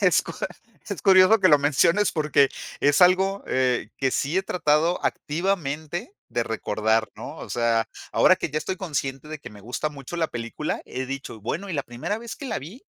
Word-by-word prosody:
Es - - +4
cu - - -7 0.6
es - - -4
curioso 190 +2 +7
que 185 - +5
lo 150 - +7
menciones 160 +8 +3
porque 150 -3 +3 0.3
es 145 0 +3
algo, 190 +2 +4
eh, 130 -1 0
que 135 -1 +1
sí 145 +7 -1
he - - 0
tratado 165 -1 +2
activamente 170 - -2 0.2
de 120 -1 0
recordar, 110 0 0
¿no? - - -8
O - - -8
sea, 115 -1 +1 0.2
ahora - - +5
que - - -3
ya 150 - -4
estoy 190 +4 -3
consciente 150 -6 -3
de 155 - -6
que - - -10
me 105 -1 -13
gusta 125 +8 -3
mucho 140 +3 -8
la 165 -1 +1
película, 120 +6 -4
he 130 +1 -4
dicho: 135 -4 -6
"Bueno", 175 - -3
y - - -4
la 140 - 0
primera 120 - -4
vez 235 0 -7
que 280 - -7
la 225 - -2
vi, 175 - -11
150 Hz, 200 wpm, -25 LUFS, 130-185 Hz, 0.6 s, curioso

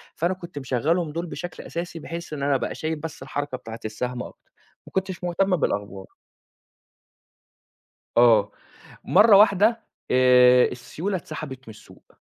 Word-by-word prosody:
فأنا 170 +3 0
كنت 175 -5 -9
مشغّلهم 150 +6 -1
دُول 170 +3 -4
بشكل 175 +1 -7
أساسي 170 0 -6
بحيث 170 +1 -7
إن 140 -2 -4
أنا 140 0 +2
أبقى 130 - -2
شايف 160 0 -3
بس 160 - -7
الحركة 145 -2 -4
بتاعة 115 -1 -9
السهم 125 +3 -4
أكتر، - - -14 0.4
ما - - -13
كنتش 190 -1 -3
مُهتَم 180 +2 +1
بالأخبار. 100 - -3 2.1
آه، 110 -4 +5 0.5
مَرّة 205 +2 +6
واحدة 215 +3 +4 0.3
آآ، 125 -1 +6
السيولة 160 +10 -4
اتسحبت 155 -6 -7
من - - -8
السوق، - - -19
155 Hz, 135 wpm, -24 LUFS, 125-180 Hz, 2.1 s, مَرّة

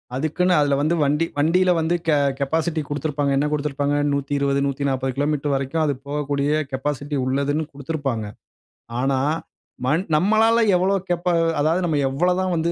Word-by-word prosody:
அதுக்குன்னு 160 +6 +1
அதுல 145 -1 +2
வந்து 160 +3 +1
வண்டி 150 +3 +1
வண்டில 180 +5 +3
வந்து 165 +2 +1
கெ 155 - +4 0.2
கெபாசிட்டி 160 +3 0
குடுத்திருப்பாங்க. 145 -1 -1
என்ன 145 - +1
குடுத்திருப்பாங்க? 145 -1 -1 0.2
120, 140 0 0
140 135 -2 -1
கிலோமீட்டர் 145 0 0
வரைக்கும் 135 +4 -1
அது 145 - +1
போகக்கூடிய 145 0 0
கெபாசிட்டி 145 +2 -3
உள்ளதுன்னு 140 +4 0
குடுத்திருப்பாங்க. 140 -6 -3 0.7
ஆனா 135 0 +1 0.7
மன் 155 +7 +1
நம்மளால 220 +6 +3 0.2
எவ்வளவு 190 +1 +1
கெபா 175 +1 0 0.3
அதாவது 160 +5 +2
நம்ம 160 -3 0
எவ்வளதான் 180 +6 0
வந்து 170 0 0
145 Hz, 135 wpm, -22 LUFS, 140-165 Hz, 0.7 s, கெ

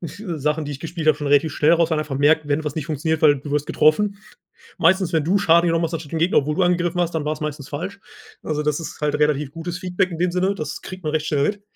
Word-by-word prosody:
Sachen, 160 -4 -3
die 145 - -5
ich 140 - -6
gespielt 160 +1 -3
habe, 155 - +5
schon 145 - -4
relativ 145 +2 +3
schnell 150 +3 +3
raus, 170 -1 +3
weil 160 - +1
einfach 150 -3 -3
merkt, 150 +2 +3
wenn 145 +2 0
was 150 0 -5
nicht 155 -1 -3
funktioniert, 160 +1 -2
weil 145 -3 +5
du 145 - -8
wirst 145 0 0
getroffen. 200 +6 +2 0.6
Meistens, 185 +1 +2
wenn 155 -2 +2
du 190 +5 +2
Schaden 170 -1 +4
genommen 165 0 +1
hast, 165 - -6
anstatt 160 -2 -6
den 165 - -1
Gegner, 170 +3 +3
obwohl 150 +2 -1
du 190 - +2
angegriffen 175 0 +1
hast, 175 -1 -1
dann 155 -2 -1
war 150 - -1
es 155 - -6
meistens 150 -2 -5
falsch. 180 +7 -5 0.4
Also, 150 -1 -2
das 150 -1 0
ist 165 - -8
halt 150 -1 0
relativ 150 -2 +1
gutes 170 +2 -5
Feedback 185 0 -1
in 165 - -6
dem 180 0 +1
Sinne. 185 +2 +1
Das 155 -5 -6
kriegt 185 0 -9
man 155 -2 -2
recht 155 -1 0
schnell 145 -2 +1
mit. 205 +2 -2
160 Hz, 275 wpm, -21 LUFS, 150-175 Hz, 0.6 s, habe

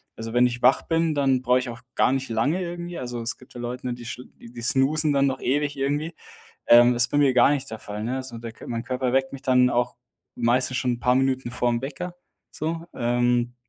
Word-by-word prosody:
also, 115 0 -6
wenn 120 +1 +5
ich 120 0 -5
wach 135 - +5
bin, 165 -1 +1
dann 135 -3 +2
brauche 125 0 +3
ich 130 -1 -5
auch 120 0 -8
gar - - +3
nicht 135 -1 -2
lange 140 +11 0
irgendwie. 175 0 -5
Also, 120 -1 -5
es 115 - -3
gibt 125 - -18
ja - - -7
Leute, 125 +1 -4
die 120 0 -10
sch 120 +2 -6 0.2
die 120 0 -10
snoozen 140 +5 +2
dann 140 0 +3
noch 130 -1 -3
ewig 145 +2 0
irgendwie, 145 +4 -1 0.5
ähm, 120 +1 +7
das 120 0 +3
ist - - -1
bei 145 - +1
mir 140 -3 +4
gar 125 +2 +6
nicht 140 -2 -2
der 110 - -6
Fall, 105 0 -7
ne? 130 +3 -2
So 125 -3 -8
der 115 0 -7
Kör - - -12
mein 115 0 -3
Körper 125 0 -2
weckt 135 0 +1
mich 135 - -8
dann 125 -1 +4
auch 120 0 0 0.4
meistens 125 +2 +1
schon 125 -1 0
'n 120 - -10
paar 125 +1 +3
Minuten 130 -1 0
vorm 120 -1 0
Wecker 150 +6 -5 0.4
so, 165 +2 -4
ähm, 120 0 +1
125 Hz, 235 wpm, -24 LUFS, 120-140 Hz, 0.5 s, ähm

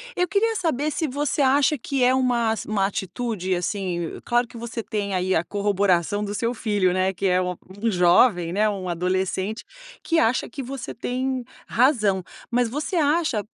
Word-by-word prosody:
Eu 360 0 +1
queria 445 +4 +1
saber 310 -5 0
se 315 +1 -1
você 285 +2 -1
acha 280 +2 +4
que 260 +1 -1
é 255 +1 +5
uma 245 -3 +2
ass 220 - -3
uma 205 -2 +1
atitude, 195 -1 -2
assim, 175 -2 -3
claro 240 0 +1
que - - -16
você 230 -1 -5
tem 200 -2 -3
aí 185 +1 0
a 160 - +2
corroboração 200 -1 +1
do 205 0 -4
seu 230 +2 -1
filho, 205 -6 +1
né, 185 +1 +1
que 195 - -4
é 185 0 +3
um 180 0 -2 0.3
um 230 - +2
jovem, 175 -1 +4
né, 215 +2 +2
um 190 -3 -4
adolescente 185 +4 -1 0.4
que 330 -1 +2
acha 230 +3 +2
que 280 - -7
você 265 0 -6
tem 255 +2 -2 0.2
razão. 215 -7 +2 0.3
Mas 240 -1 +2
você 300 +8 -3
acha, 300 -8 +2
220 Hz, 180 wpm, -24 LUFS, 190-260 Hz, 0.4 s, é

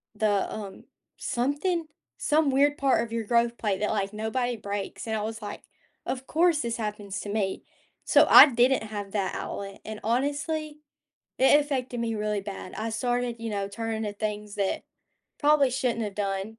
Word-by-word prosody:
the, 210 -2 +1
um, 200 -3 -7 0.3
something 295 +7 -1 0.3
some 300 -1 +2
weird 285 +2 +3
part 270 -4 +2
of 230 - -8
your 230 -1 -2
growth 235 +1 +2
plate 200 -4 -1
that, 210 - +1
like, 200 -1 -1
nobody 240 +3 -1
breaks. 205 -2 -5
And 220 -1 -2
I - - -2
was 220 +1 -4
like, 205 -1 -7 0.4
"Of 260 0 -3
course, 330 -1 +3
this 235 -1 -2
happens 205 -3 -4
to 205 - -7
me." 200 -2 -1 0.4
So, - - +6
I - - +11
didn't 255 0 +3
have 205 -2 -6
that 195 -2 -1
outlet 195 -1 -6
and 215 0 -6
honestly, 290 +6 -1 0.6
it 265 +3 +6
affected 260 -4 -3
me 230 -1 -1
really 210 -1 -1
bad. 195 -2 -7
I 220 +2 -3
started, 245 +1 -1
you 230 -1 -4
know, 200 -1 -2
turning 225 +2 -3
to 210 - -3
things 210 0 -4
that 195 -1 -1 0.5
probably 290 -2 +4
shouldn't 245 -2 -1
have 205 -2 -4
done. 200 +2 -3
225 Hz, 175 wpm, -27 LUFS, 205-260 Hz, 0.6 s, I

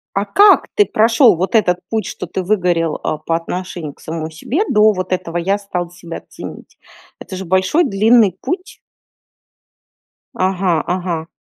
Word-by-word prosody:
А 195 +1 0
как 400 - +5
ты 415 - +5
прошел 225 -1 +4
вот 185 +7 -2
этот 180 -5 +3
путь, 220 -3 -1
что - - -6
ты 190 - -4
выгорел, 175 -5 0
а, 155 - -1
по 165 +1 -1
отношению 170 -2 -5
к - - -29
самому 160 0 -5
себе 260 - -2
до 210 +1 +5
вот 185 -2 -4
этого 175 -2 -3
"я 195 +4 0
стал 180 -4 -5
себя 170 -1 -9
ценить"? - - -10 0.4
Это 190 - -8
же 190 0 -6
большой 190 - +2
длинный 210 - +3
путь. 365 +3 -4 1.6
Ага, 185 -3 +1
ага. 175 -2 -3
185 Hz, 155 wpm, -17 LUFS, 170-215 Hz, 1.6 s, как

